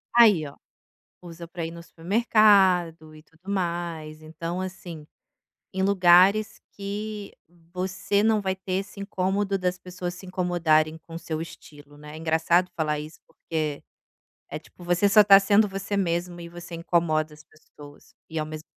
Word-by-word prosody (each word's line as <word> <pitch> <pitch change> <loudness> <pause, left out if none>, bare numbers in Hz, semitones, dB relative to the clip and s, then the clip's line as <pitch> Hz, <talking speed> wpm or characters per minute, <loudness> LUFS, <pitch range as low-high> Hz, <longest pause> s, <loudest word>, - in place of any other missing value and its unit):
Aí 210 -10 +6
ó, 140 - -13 0.6
usa 170 -1 -10
para 170 -1 -5
ir - - -6
no 170 0 -10
supermercado 185 -4 +2
e 155 - -14
tudo 165 +5 -13
mais, 170 -4 -3
então 165 +3 -5
assim, 180 -4 -8 0.7
em 190 - -2
lugares 195 +2 +4
que 205 +1 -6 0.4
você 190 +2 -1
não 220 -1 +3
vai 190 -1 -1
ter 190 0 -5
esse 200 +1 -11
incômodo 195 0 -1
das 180 0 -2
pessoas 180 0 -6
se 185 +1 -12
incomodarem 165 -4 +1
com 165 +1 -14
o - - -4
seu 160 -1 -5
estilo, 145 -3 -12
né. 150 +1 -11
Engraçado 165 +3 +1
falar 150 -2 -1
isso 150 +2 -9
porque, 155 -3 -4 0.7
é - - -5
tipo 175 - -17
você 175 +3 +2
só 210 +1 +7
tá 200 -1 +9
sendo 205 +2 +4
você 195 +1 -4
mesmo 175 -2 -2
e 170 - -8
você 175 0 -10
incomoda 165 -2 0
as 150 - -16
pessoas 145 -2 -17 0.2
e 160 - -3
ao 155 - -2
mesmo 155 0 -8
175 Hz, 160 wpm, -25 LUFS, 160-195 Hz, 0.7 s, tá